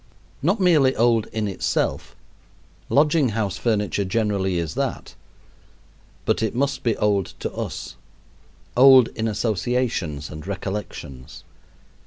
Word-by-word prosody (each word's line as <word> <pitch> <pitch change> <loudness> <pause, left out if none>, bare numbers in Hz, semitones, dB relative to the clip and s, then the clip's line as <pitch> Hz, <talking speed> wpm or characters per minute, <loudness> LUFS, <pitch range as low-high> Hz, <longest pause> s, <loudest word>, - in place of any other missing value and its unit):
Not 185 +9 +1
merely 155 -8 +4
old 115 -1 +2
in 110 -2 -3
itself 95 - -2 0.7
lodging 150 -1 +3
house 105 -3 -2
furniture 105 -3 0
generally 95 -2 0
is 85 -3 -3
that - - -3 1.1
but - - +1
it 110 0 -1
must 140 +2 0
be 115 -3 0
old 100 -3 0
to - - -4
us, - - -6 0.8
old 130 -1 +7
in 110 - -3
associations 105 - -1
and 75 +3 -9
recollections. 95 -9 -6
110 Hz, 115 wpm, -23 LUFS, 95-125 Hz, 1.1 s, old